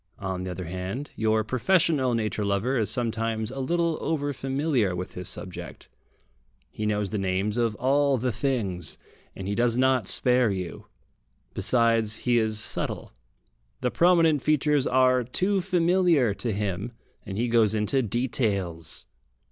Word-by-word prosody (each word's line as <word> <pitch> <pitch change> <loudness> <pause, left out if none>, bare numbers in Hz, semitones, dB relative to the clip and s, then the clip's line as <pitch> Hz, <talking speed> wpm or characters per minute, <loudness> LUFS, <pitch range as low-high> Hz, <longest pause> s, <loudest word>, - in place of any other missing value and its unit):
On 95 -2 -4
the 95 - -4
other 90 0 -5
hand, 95 - -5
your 110 0 +1
professional 130 - +2
nature 110 -1 -1
lover 100 +6 0
is 110 -5 0
sometimes 115 -1 -1
a 135 - -6
little 170 +4 0
over 145 -3 -1
familiar 135 - 0
with 90 +1 -6
his 90 -1 -6
subject. 90 -1 -8 0.8
He 105 - -3
knows 105 -2 -1
the 105 - -1
names 95 +2 -1
of 115 -3 0
all 140 +3 +2
the 125 +1 -1
things, 105 - -2 0.4
and 95 - -6
he 100 - -1
does 120 +2 +1
not 130 -5 +2
spare 125 -2 +3
you. 90 -4 -5 0.7
Besides, 115 -3 +2
he 120 -1 +4
is 110 -1 0
subtle. - - -4 0.7
The 125 - 0
prominent 165 -4 +4
features 150 -1 +2
are 130 -1 +3
too 190 - 0
familiar 175 - +2
to 115 +3 -2
him, 100 +2 -3 0.3
and 100 -3 -6
he 120 +2 0
goes 115 -2 +3
into 110 +6 +1
details. 100 - -1
115 Hz, 150 wpm, -26 LUFS, 105-135 Hz, 0.8 s, he